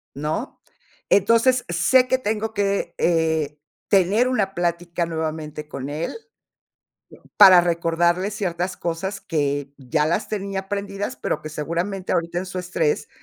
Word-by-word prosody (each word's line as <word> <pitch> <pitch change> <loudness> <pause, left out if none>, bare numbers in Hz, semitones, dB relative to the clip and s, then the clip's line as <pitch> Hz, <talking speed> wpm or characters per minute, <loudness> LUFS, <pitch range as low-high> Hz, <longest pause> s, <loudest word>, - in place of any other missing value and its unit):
¿No? 155 - -4 0.5
Entonces, 230 +5 +4
sé 250 +10 +3
que 260 - +2
tengo 220 -2 -2
que, 200 -3 -1
eh, 160 -3 +1 0.3
tener 200 +5 +3
una 200 -6 0
plática 170 0 -1
nuevamente 155 -2 -4
con 140 -2 -6
él, 150 +3 -3 1.2
para 190 -3 +9
recordarle 170 +2 +1
ciertas 180 -3 -3
cosas 190 +4 -3
que 145 -3 -2
ya 150 +3 0
las 170 +6 -1
tenía 195 -2 -3
aprendidas, 200 +3 -4
pero, - - -3
que 155 - -6
seguramente 170 +5 -3
ahorita 170 +1 -1
en 185 - -4
su 185 0 -5
estrés 315 - -1
175 Hz, 130 wpm, -22 LUFS, 160-200 Hz, 1.2 s, para